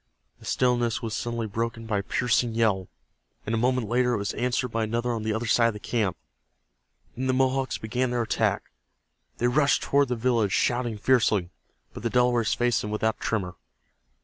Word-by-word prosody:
The - - -15
stillness 120 -2 +1
was 110 -1 -3
suddenly 115 -1 -3
broken 115 +2 -3
by 105 -2 0
a - - -1
piercing 120 +2 0
yell, 105 -5 +1 0.6
and 110 - -2
a - - +2
moment 125 -1 +1
later 125 +1 +2
it - - -1
was 100 -1 -3
answered 125 +1 -1
by 115 0 -1
another 120 +2 -1
on 115 -2 -2
the 110 0 -1
other 110 +2 -2
side 115 0 +4
of 115 - -1
the 105 - -8
camp. 105 -4 -1 1.0
Then 130 +2 -2
the 130 - +2
Mohawks 130 0 +1
began 125 +3 -1
their 120 -1 0
attack. 110 - -1 0.7
They 120 - +1
rushed 140 +3 +2
toward 140 0 +2
the 125 - -1
village 115 -4 +1
shouting 120 -3 0
fiercely, 105 -5 +2 0.4
but - - -8
the 115 - -1
Delawares 120 -1 +2
faced 120 -1 +1
them 105 - -5
without 110 +1 0
a - - -32
tremor. 90 -6 -2
115 Hz, 195 wpm, -26 LUFS, 110-125 Hz, 1.0 s, side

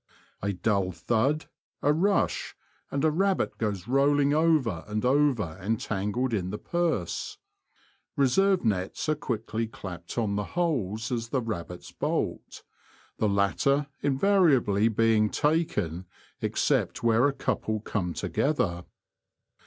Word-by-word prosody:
A 100 - 0
dull 100 -1 0
thud, 120 - 0 0.4
a 145 - +4
rush, 195 +6 +1 0.3
and 140 +2 0
a 155 - +4
rabbit 190 +4 0
goes 105 -4 -2
rolling 140 +2 +3
over 150 - +2
and 105 +2 -2
over 125 - +2
entangled 110 +3 -1
in 95 -4 -1
the 105 - -4
purse. 165 - -2 0.8
Reserve 185 +6 +3
nets 95 +2 -1
are - - +4
quickly 115 -4 -3
clapped 90 -5 -8
on 105 -4 0
the 105 - 0
holes 115 - -1
as 115 -2 -2
the 130 - 0
rabbits 90 -5 -6
bolt, - - -3 0.6
the 110 - +2
latter 140 +9 +1
invari 165 +3 +4
ably 105 -3 +2
being 110 -1 +3
taken 105 - 0 0.3
except - - 0
where 115 +3 +4
a - - +1
couple 110 -5 -2
come 95 -5 -3
together. 90 - -1
115 Hz, 125 wpm, -27 LUFS, 100-145 Hz, 0.8 s, a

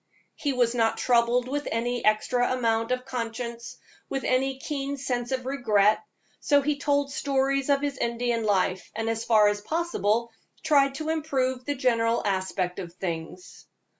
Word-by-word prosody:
He 290 - -2
was 245 -2 +2
not 225 -2 +1
troubled 240 0 +2
with 290 +2 -3
any 240 +1 -1
extra 245 +4 +2
amount 230 -2 0
of 255 0 -1
conscience, 235 -1 -5 0.3
with 270 -1 -2
any 265 +1 +1
keen 280 0 -4
sense 245 -2 -3
of 260 -1 -2
regret, 215 -6 +3 0.4
so 285 -1 +3
he 290 0 0
told 285 -1 +1
stories 275 0 0
of 280 -1 +3
his 285 -2 -3
Indian 235 0 -1
life, 190 -3 0
and 225 +1 -2
as 225 0 -1
far 215 -3 +5
as 205 0 0
possible 235 -6 0 0.3
tried 275 -3 +3
to 310 +2 -4
improve 265 -5 -1
the 290 - -1
general 235 -3 +1
aspect 190 -2 -1
of 175 -3 -7
things. 180 +1 -6
245 Hz, 160 wpm, -26 LUFS, 225-275 Hz, 0.4 s, far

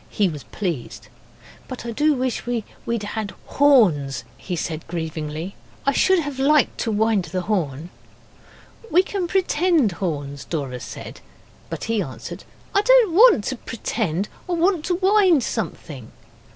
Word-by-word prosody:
He 205 -3 +1
was 150 -4 -8
pleased. 170 - -5 0.6
'But 255 -2 -7
I 235 - -3
do 295 +6 +2
wish 255 -1 -1
we'd 235 -1 -3
had 205 -3 -4
horns,' 200 - +3
he 180 +7 -5
said 160 -1 -3
grievingly. 160 +1 -4 0.3
'I 275 - +4
should 375 +7 +4
have 285 -3 -5
liked 290 +1 +3
to 225 - -1
wind 215 -3 +2
the 180 +2 -3
horn.' 170 -5 -2 1.0
'We 365 +3 +5
can 385 -2 -3
pretend 340 - +2
horns,' 145 -6 -4
Dora 135 -6 -4
said; - - -9 0.5
but - - -5
he 225 -2 0
answered, 130 -9 -7 0.3
'I 400 - +4
didn't 485 -5 +5
want 425 - +7
to 260 - -2
pretend. 210 -5 -2 0.2
I - - 0
wanted 345 -1 +2
to 360 - +1
wind 375 - +4
something. 155 - -5
220 Hz, 145 wpm, -22 LUFS, -, 1.0 s, want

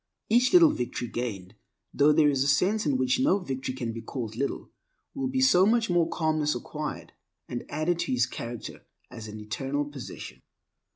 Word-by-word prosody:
Each 245 +4 +4
little 340 -4 +7
victory 120 -1 -4
gained 100 -7 -5 0.4
(though 145 +1 +5
there 150 0 +4
is 135 -2 +2
a - - -1
sense 185 +7 +2
in 140 -3 +2
which 130 0 +1
no 260 -7 +3
victory 135 -8 -4
can 120 -3 -4
be 115 - -6
called 115 -2 -5
little) 140 +4 -3 0.4
will 270 -2 -2
be 260 0 -1
so 190 -9 +5
much 230 -2 +2
more 170 -2 +2
calmness 155 -2 0
acquired 90 - -6 0.3
and 120 - -5
added 155 +3 -1
to - - -2
his 125 -2 +3
character 120 -1 -7 0.3
as 110 -1 -8
an 105 0 -8
eternal 135 +7 -3
possession. 130 - -9
145 Hz, 180 wpm, -27 LUFS, 120-175 Hz, 0.4 s, little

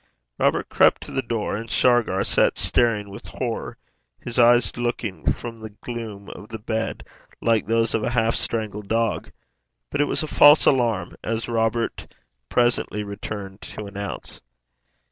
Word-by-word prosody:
Robert - - +2
crept - - +4
to - - -9
the 135 - 0
door, 115 -5 -2
and 115 +2 -6
Shargar 120 -7 +3
sat - - +2
staring 105 -4 +1
with 100 - -10
horror, - - -4 0.4
his 120 +1 -4
eyes 120 0 +5
looking 120 -7 -1
from 115 -2 -6
the 110 0 -7
gloom 105 -2 -7
of 105 - -11
the 110 - -5
bed 110 +1 -3 0.4
like 115 -2 +1
those 115 0 +1
of 115 - +1
a - - 0
half 115 -1 +2
strangled 105 -2 -2
dog. 115 +1 0 0.6
But - - +1
it - - +4
was 145 - -1
a - - -3
false 145 +1 +7
alarm, 115 -9 +2
as 115 0 -2
Robert 115 0 -1 0.4
presently 120 -3 +1
returned 100 -1 -7
to 105 - -7
announce. 100 0 -6
115 Hz, 155 wpm, -23 LUFS, 105-120 Hz, 0.6 s, false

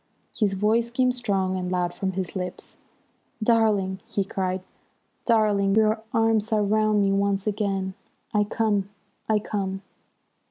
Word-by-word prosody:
His 205 -3 +1
voice 220 +4 +2
came 255 +1 +2
strong 200 -7 -1
and 180 -1 -3
loud 175 -1 0
from 190 -1 -2
his 185 0 -3
lips. 180 -1 -5 0.7
"Darling!" 215 -5 +2
he 200 - -1
cried. 185 -1 -2 0.6
"Darling, 210 -4 +3
your 220 0 +3
arms 225 -1 +2
are 215 -1 +3
round 215 0 +2
me 195 - +2
once 195 0 +1
again! 195 -3 -1 0.4
I 210 -1 +3
come! 205 -2 0 0.4
I 215 - +4
come!" 195 -2 -3
205 Hz, 135 wpm, -25 LUFS, 190-220 Hz, 0.7 s, I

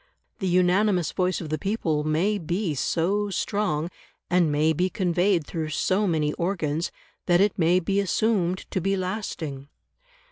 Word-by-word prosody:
The 190 - -1
unanimous 180 0 +2
voice 185 0 0
of 160 - -6
the 155 0 -2
people 165 -7 -1
may 170 +8 +1
be 175 +1 -1
so 190 +8 0
strong, 185 -5 -1 0.4
and 175 -3 +3
may 155 +2 +2
be 180 +4 0
conveyed 180 -2 +1
through 160 -1 -4
so 190 +6 +1
many 155 -3 +1
organs, 170 -3 -1 0.4
that 175 -1 +4
it 200 0 +3
may 175 +2 +4
be 195 +3 0
assumed 195 -2 0
to 185 - -1
be 195 +2 0
lasting. 180 -8 -4
180 Hz, 150 wpm, -25 LUFS, 160-195 Hz, 0.4 s, that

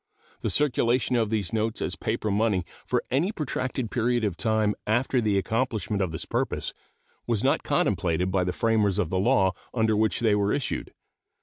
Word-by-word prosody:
The - - -2
circulation 125 -3 +2
of 115 -3 +1
these 105 -5 -2
notes 110 0 -1
as - - -2
paper 105 - -2
money 100 -3 +1 0.2
for - - +1
any 155 +10 +2
protracted 130 - -3
period 120 0 +1
of 100 -5 0
time 110 0 +1
after 120 +3 +2
the 105 -3 +1
accomplishment 110 -1 -1
of 95 -4 0
this 80 - -5
purpose - - -2 0.5
was 115 -2 0
not 135 - +2
contemplated 95 - 0
by 95 -1 +2
the 90 - 0
framers 105 -2 +1
of 80 - 0
the 95 - +1
law 95 -1 +3 0.2
under 110 -2 +2
which 110 +1 +1
they 110 -3 +3
were 100 0 +2
issued. 140 - -2
110 Hz, 180 wpm, -26 LUFS, 100-120 Hz, 0.5 s, law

